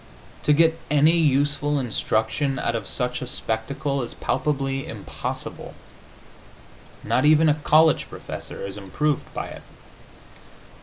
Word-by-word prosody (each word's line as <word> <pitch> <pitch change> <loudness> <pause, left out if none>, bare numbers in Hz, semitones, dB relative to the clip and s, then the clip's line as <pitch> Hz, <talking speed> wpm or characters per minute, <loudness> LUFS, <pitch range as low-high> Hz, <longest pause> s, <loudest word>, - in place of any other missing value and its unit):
To - - +4
get 165 +2 +3
any 150 +3 +5
useful 145 -1 +2
instruction 120 +2 0
out 115 - -1
of 110 -4 -3
such 125 -1 -2
a 125 - -4
spectacle 135 +5 -2
is 120 - -5
palpably 135 -2 -1
impossible; - - -6 1.3
not 130 - +1
even 155 +2 +5
a 150 - +5
college 155 +1 +4
professor - - -7
is 100 +1 -6
improved 130 +10 -1
by - - -4
it. - - -10
140 Hz, 120 wpm, -24 LUFS, 125-150 Hz, 1.3 s, any